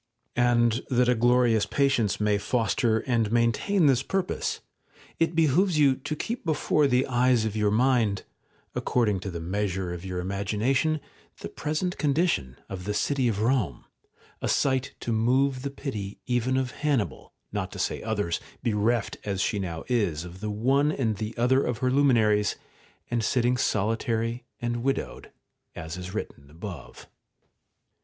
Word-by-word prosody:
§ - - -53
10. 125 - +3
And 120 +1 +2
that 125 -1 +3
a 125 - +5
glorious 120 -2 +3
patience 130 -5 +1
may 105 -1 +2
foster 110 +1 +1
and 115 -4 0
maintain 120 - +2
this 130 -3 +4
purpose, 190 +6 -2 0.6
it 165 0 +1
behoves 165 +3 +3
you 140 -3 +5
to 145 +4 -5
keep 235 +10 -4
before 155 -3 +2
the 125 0 +2
eyes 125 -2 +2
of 110 -1 -2
your 105 -1 +2
mind, 115 -3 +2 0.5
according 105 -6 +1
to 95 - -5
the 85 -2 -5
measure 95 0 -2
of 85 0 -7
your 90 -1 -4
imagination, 105 - 0 0.4
the - - -5
present 155 +5 -2
condition 145 - +1
of 90 -2 -7
the 105 0 -2
city 135 0 +1
of 115 - +1
Eome, 115 0 0 0.6
a - - -1
sight 130 -1 +1
to 120 - -2
move 130 +4 +2
the 140 - -3
pity 110 -8 -5
even 125 +1 +1
of 130 -1 -1
Hannibal, 140 -3 -2 0.2
not - - -3
to - - -8
say - - -1
others, 105 -6 -1 0.2
bereft 110 0 0
as 100 -2 -2
she 100 +2 0
now 85 -4 -4
is 100 -10 0
of 90 +1 -10
the 110 - -2
one 135 +8 +2
and 115 -8 -1
the 110 +1 -5
other 130 +3 +3
of 120 -2 -1
her 130 +1 0
luminaries, 110 -7 +3 0.6
and 120 -1 0
sitting 125 +2 +2
solitary 115 +2 -1
and 120 -1 -2
widowed, 135 +2 -3 0.4
as 80 0 -6
is 90 0 -7
written 70 -8 -6
above. 85 +5 -9
120 Hz, 160 wpm, -27 LUFS, 105-130 Hz, 0.6 s, a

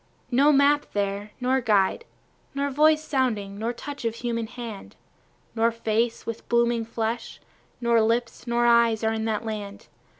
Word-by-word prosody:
No 280 +5 +5
map 285 +1 +3
there, 200 +1 -2
nor 260 +1 +1
guide, 215 - +2 0.5
Nor 280 0 -1
voice 305 +2 +4
sounding, 220 -9 -1
nor 225 +2 -1
touch 280 +3 -8
of 230 -1 -1
human 230 -1 -3
hand, 230 -4 -8 0.6
Nor 230 0 +2
face 230 0 -1
with 230 0 -6
blooming 235 -1 +2
flesh, 230 +1 -4 0.4
nor 235 -1 +3
lips, 230 +2 -1
nor 240 0 +1
eyes, 235 -2 +4
are 220 0 +1
in 220 0 -2
that 220 0 -2
land. 205 -2 -6
230 Hz, 155 wpm, -25 LUFS, 220-245 Hz, 0.6 s, No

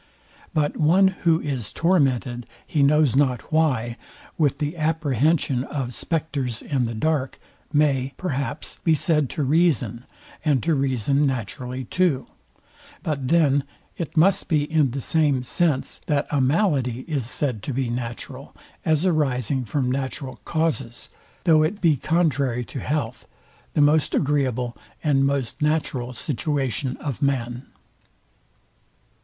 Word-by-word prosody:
But 150 -1 +1
one, 180 +5 +5
who 170 -3 +1
is 130 -7 -3
tormented 135 -8 +1 0.2
he 150 - 0
knows 145 -2 +4
not 135 0 +1
why, 125 -7 +1 0.4
with 145 -5 +1
the 150 +2 -2
apprehension 155 -4 +1
of 130 -5 -4
spectres 145 -8 -2
in 130 -4 0
the 115 0 -4
dark, 140 +1 0 0.3
may, 140 -3 +1
perhaps, 145 -3 -4
be 165 -2 +4
said 150 -3 +2
to 150 - -2
reason, 140 - +1 0.4
and 145 -6 +2
to 165 - +2
reason 140 +1 +1
naturally 125 +1 -4
too: 165 -3 +1 0.8
But 140 -4 -2
then 145 -3 +3 0.3
it 165 -1 -5
must 195 +4 +4
be 150 -3 +3
in 150 -2 +2
the 135 +3 -4
same 145 -4 +2
sense, 150 +1 0
that 145 -1 +1
a 145 -2 +2
malady 130 - +1
is 140 -6 -3
said 125 -4 -1
to 140 - -4
be 130 -2 -1
natural; 120 -1 -6 0.3
as 160 +2 +2
arising 135 - +1
from 125 +3 -1
natural 130 -1 -4
causes, 155 -7 -2 0.3
though 160 -3 +5
it 165 +7 0
be 165 -6 +4
contrary 140 -5 0
to 130 - -7
health, 125 -4 -3 0.5
the 150 - +4
most 150 +1 +3
agreeable 130 -4 0 0.3
and 135 -3 +3
most 140 -3 -2
natural 150 -5 0
situation 135 -1 -2
of 140 -5 -5
man. 125 -2 -1
140 Hz, 135 wpm, -23 LUFS, 125-155 Hz, 0.8 s, one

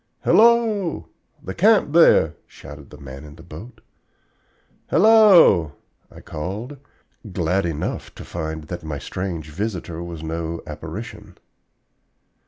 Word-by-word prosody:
"Hello, 220 -6 +3 0.3
the 95 - -6
camp 205 - +3
there!" 120 - +5
shouted 75 0 -13
the 75 - -13
man 70 -1 -10
in 75 -1 -12
the 80 - -15
boat. 90 +9 -12 1.1
"Hello!" 180 - +5 0.4
I - - -14
called, 100 - -6 0.5
glad 90 +1 0
enough 80 -2 -5
to - - -10
find 80 -2 -5
that 85 +2 -8
my 75 -2 -5
strange 85 -1 -6
visitor 90 -2 -5
was 85 -2 -8
no 80 +1 -5
apparition. 100 +6 -9
85 Hz, 115 wpm, -21 LUFS, 80-120 Hz, 1.1 s, there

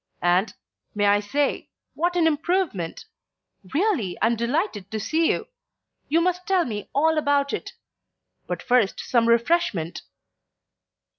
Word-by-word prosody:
And 180 +4 +2 0.4
may 205 0 +1
I 205 0 +4
say 275 +8 -1 0.2
what 350 +2 -1
an 345 -2 +3
improvement. 320 - -1 0.7
Really, 295 - 0
I'm 230 +1 +2
delighted 235 - -2
to 220 - -3
see 315 +9 +1
you. - - -2 0.6
You 325 +3 +3
must 360 +1 -1
tell 375 -3 +2
me 210 -4 -5
all 315 +2 +3
about 285 -1 +1
it. - - -5 0.7
But - - -4
first 245 -5 +2
some 235 -2 +1
refreshment." 235 - +1
280 Hz, 130 wpm, -24 LUFS, 205-335 Hz, 0.7 s, I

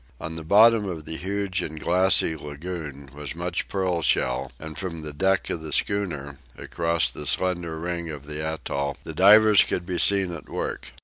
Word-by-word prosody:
On 80 0 -6
the 80 - -5
bottom 105 +4 +5
of 80 -4 -6
the 80 - -5
huge 95 +1 -2
and 80 -2 -6
glassy 90 0 +3
lagoon 75 -2 -7
was 75 +1 -6
much 85 0 -3
pearl 95 -3 -1
shell, 65 -5 0
and 80 +2 -8
from 85 -4 -5
the 75 -1 -6
deck 95 +5 +1
of 80 - -3
the 80 -1 -7
schooner, 75 -9 0 0.2
across 85 -1 0
the 75 - -6
slender 85 -2 0
ring 85 0 -3
of 75 -2 -8
the 75 +1 -5
atoll, 70 -3 -3
the - - -7
divers 105 +2 +7
could 90 - -3
be 90 -1 -3
seen 95 -3 +3
at 80 - -9
work. 65 - -4
85 Hz, 185 wpm, -25 LUFS, 75-95 Hz, 0.2 s, divers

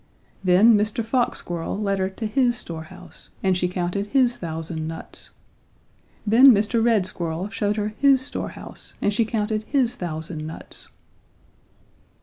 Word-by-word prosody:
Then 195 +5 +6
Mr. 215 +2 0
Fox 245 +2 +1
Squirrel 175 +3 -4
led 200 -2 0
her 190 0 0
to 205 +4 -6
his 240 +2 +2
storehouse 160 -5 -9
and 190 -1 +3
she 180 0 0
counted 180 +3 -2
his 250 0 +3
thousand 160 -1 -4
nuts. 160 0 -7 1.0
Then 230 +6 +7
Mr. 225 -1 +4
Red 225 -5 +3
Squirrel 175 +1 -3
showed 205 0 -1
her 210 0 -1
his 270 +5 +4
store 260 - -4
house - - -11
and 205 - +1
she 225 +2 +2
counted 215 -1 -1
his 250 -4 +1
thousand 160 -2 -5
nuts. 160 - -10
205 Hz, 145 wpm, -23 LUFS, 175-230 Hz, 1.0 s, Then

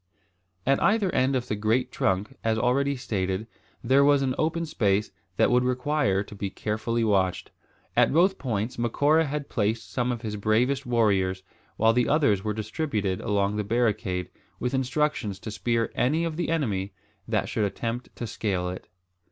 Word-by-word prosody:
At 135 +1 +2
either 205 -3 +2
end 130 +1 +2
of 125 -1 -1
the 105 - -1
great 110 +4 0
trunk, 95 +2 -1
as 110 0 +1
already 135 +4 +1
stated 100 -5 -2 0.4
there 135 +4 +4
was 140 -1 +4
an 130 -1 0
open 165 +2 0
space 105 -8 0 0.3
that - - +4
would 125 0 +4
require 125 -5 +1
to 105 - -12
be 100 -1 -4
carefully 110 +3 -2
watched. 95 -4 +1 0.4
At - - +4
both 185 +5 +3
points 115 -2 -2
Macora 145 +7 +3
had 145 0 -3
placed 110 0 -1
some 125 -1 0
of 120 -1 -5
his 105 -2 -3
bravest 125 +6 +1
warriors, 95 -6 +1 0.3
while 115 0 +4
the 125 0 +2
others 140 -11 +3
were 105 - -1
distributed 110 - -2
along 100 -1 0
the 105 - 0
barricade, 100 -5 0 0.3
with 125 +1 -2
instructions 130 -5 0
to 110 +2 -7
spear 115 +2 -1
any 150 +7 +1
of 165 -2 -2
the 170 -1 -2
enemy 105 -12 -1 0.3
that 110 -1 0
should 110 - 0
attempt 115 +4 -4
to 120 - -5
scale 100 -5 -2
it. 90 - -7
115 Hz, 170 wpm, -26 LUFS, 105-135 Hz, 0.4 s, there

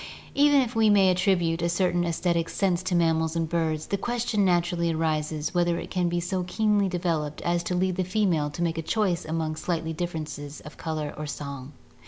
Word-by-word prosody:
Even 285 0 +5
if 245 -2 -3
we 220 -1 +4
may 195 -2 +5
attribute 180 -3 +1
a 170 - +1
certain 175 0 +1
aesthetic 170 0 0
sense 185 -3 0
to 185 -1 -1
mammals 160 -1 +2
and 165 -1 0
birds, 160 -2 -1
the 200 - -2
question 235 -2 0
naturally 175 -2 +2
arises 155 -1 -1
whether 175 -1 +2
it - - -7
can 180 -2 +1
be 175 0 0
so 180 +2 -2
keenly 205 +2 +1
developed 165 -4 -2
as 175 0 +1
to 180 - -2
lead 185 0 0
the 185 - +1
female 180 -6 +1
to 170 +4 -4
make 165 -1 -1
a - - -1
choice 185 -1 0
among 160 0 -2
slight 165 0 -2
differences 155 -4 -5
of 150 - -11
color 155 -2 -4
or 150 0 -4
song. 140 -1 -6
175 Hz, 200 wpm, -26 LUFS, 160-185 Hz, -, Even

